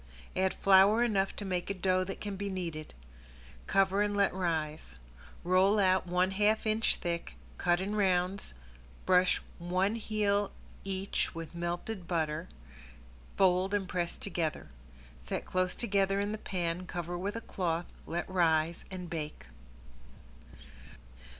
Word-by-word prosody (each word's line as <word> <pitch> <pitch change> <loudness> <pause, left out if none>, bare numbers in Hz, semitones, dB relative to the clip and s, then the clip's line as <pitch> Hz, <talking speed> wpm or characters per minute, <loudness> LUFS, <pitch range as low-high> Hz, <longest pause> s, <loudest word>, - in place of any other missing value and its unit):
Add 190 0 +1
flour 195 +4 +6
enough 195 -5 +1
to 205 - -5
make 180 -1 -2
a 200 - -1
dough 185 0 +2
that 195 - -6
can 205 -1 -4
be 200 +1 -3
kneaded. 170 -5 -5 0.7
Cover 195 +1 +3
and 205 0 +1
let 200 -1 +3
rise. 160 - -2 0.5
Roll 185 +4 +4
out 185 -2 +3
one 180 +2 +2
half 210 +3 +2
inch 220 +1 +2
thick, 170 - -4 0.2
cut 175 0 +3
in 200 +3 -2
rounds, 185 - +1 0.5
brush 180 0 +4 0.2
one 185 +5 0
half 205 -2 +1 0.3
each 195 -2 -2
with 165 0 -6
melted 175 +3 -4
butter, 160 -3 -1 0.9
fold 190 +1 +3
and 195 -2 -1
press 175 -1 -2
together. 165 - -3 0.6
Set - - -3
close 185 0 0
together 195 -3 +1
in 205 +1 -1
the 215 - -4
pan, 180 -2 -2
cover 175 0 -4
with 195 +4 -3
a 230 - -3
cloth, 175 -5 -2 0.2
let 175 +1 -2
rise, 165 -2 +2
and 185 -2 -6
bake. 155 - -5
185 Hz, 135 wpm, -31 LUFS, 175-200 Hz, 0.9 s, flour